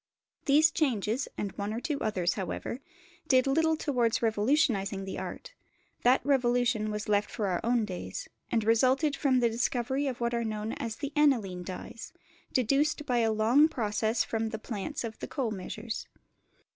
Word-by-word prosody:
These 305 Hz, +2 st, +5 dB
changes, 250 Hz, -, 0 dB
and 200 Hz, -, -2 dB
one 200 Hz, +1 st, -2 dB
or 225 Hz, -, -2 dB
two 285 Hz, +2 st, -2 dB
others, 185 Hz, -6 st, 0 dB
however, 205 Hz, +5 st, -4 dB, 0.5 s
did 255 Hz, -3 st, +4 dB
little 320 Hz, +3 st, +2 dB
towards 245 Hz, -7 st, 0 dB
revolutionising 215 Hz, -3 st, +1 dB
the 190 Hz, -, -5 dB
art; -, -, -7 dB, 0.5 s
that 250 Hz, +2 st, +3 dB
revolution 245 Hz, -5 st, +2 dB
was 210 Hz, 0 st, -4 dB
left 205 Hz, 0 st, +2 dB
for 215 Hz, -, -3 dB
our 180 Hz, -3 st, 0 dB
own 235 Hz, -1 st, +2 dB
days, 185 Hz, -3 st, -6 dB, 0.2 s
and 225 Hz, -, +2 dB
resulted 260 Hz, +7 st, +3 dB
from 260 Hz, -3 st, +2 dB
the 235 Hz, -, +4 dB
discovery 245 Hz, +4 st, 0 dB
of 255 Hz, -3 st, -3 dB
what 235 Hz, 0 st, 0 dB
are 235 Hz, 0 st, 0 dB
known 215 Hz, 0 st, -3 dB
as 225 Hz, -2 st, -4 dB
the 285 Hz, +2 st, -5 dB
Aniline 235 Hz, -12 st, +2 dB
dyes, 185 Hz, +5 st, -8 dB, 0.4 s
deduced 280 Hz, +4 st, +1 dB
by 245 Hz, -4 st, +1 dB
a 225 Hz, -1 st, +2 dB
long 230 Hz, +8 st, +5 dB
process 220 Hz, -4 st, 0 dB
from 225 Hz, 0 st, -2 dB
the 220 Hz, -, -4 dB
plants 220 Hz, +6 st, -4 dB
of 225 Hz, -1 st, -6 dB
the -, -, -5 dB
coal 260 Hz, -7 st, -2 dB
measures. 215 Hz, +3 st, -5 dB
235 Hz, 170 wpm, -29 LUFS, 215-270 Hz, 0.5 s, These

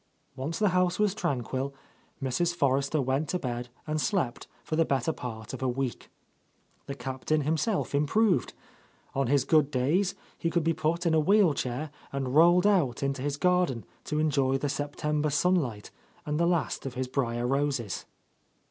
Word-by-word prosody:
Once 145 Hz, +6 st, -3 dB
the 210 Hz, -2 st, +3 dB
house 180 Hz, 0 st, +2 dB
was 210 Hz, -2 st, +2 dB
tranquil, 140 Hz, -, -2 dB, 0.5 s
Mrs. 170 Hz, +7 st, 0 dB
Forrester 140 Hz, 0 st, +1 dB
went 135 Hz, +3 st, 0 dB
to 180 Hz, -, 0 dB
bed 120 Hz, -5 st, -4 dB, 0.2 s
and 155 Hz, 0 st, -1 dB
slept 160 Hz, -, -1 dB, 0.2 s
for 155 Hz, -, -3 dB
the 165 Hz, -, +4 dB
better 140 Hz, +1 st, 0 dB
part 110 Hz, -4 st, -7 dB
of 130 Hz, -, -6 dB
a 130 Hz, -, +1 dB
week. 130 Hz, 0 st, -3 dB, 0.8 s
The 140 Hz, -, -4 dB
Captain 135 Hz, +4 st, -1 dB
himself 160 Hz, +8 st, 0 dB
improved. 180 Hz, +8 st, +2 dB, 0.6 s
On 135 Hz, -1 st, 0 dB
his 140 Hz, 0 st, +2 dB
good 155 Hz, -3 st, +4 dB
days 155 Hz, +9 st, +1 dB, 0.2 s
he 165 Hz, -, 0 dB
could 170 Hz, -1 st, +1 dB
be 165 Hz, +1 st, +2 dB
put 165 Hz, +3 st, -1 dB
into 160 Hz, -1 st, +4 dB
a -, -, +3 dB
wheel 195 Hz, 0 st, +4 dB
chair 135 Hz, +3 st, -3 dB, 0.2 s
and 135 Hz, -2 st, -2 dB
rolled 175 Hz, +4 st, +6 dB
out 170 Hz, -, +2 dB
into 135 Hz, -1 st, -1 dB
his 145 Hz, +1 st, -2 dB
garden 180 Hz, -9 st, +1 dB, 0.2 s
to 150 Hz, -, -2 dB
enjoy 140 Hz, -4 st, +2 dB
the 145 Hz, +1 st, -2 dB
September 145 Hz, +2 st, -1 dB
sunlight 145 Hz, -, 0 dB, 0.3 s
and 150 Hz, +1 st, -1 dB
the 170 Hz, -, +3 dB
last 170 Hz, -5 st, 0 dB
of 130 Hz, -, -7 dB
his 130 Hz, 0 st, -2 dB
briar 120 Hz, -2 st, -1 dB
roses. 135 Hz, -5 st, -1 dB
145 Hz, 170 wpm, -28 LUFS, 130-170 Hz, 0.8 s, rolled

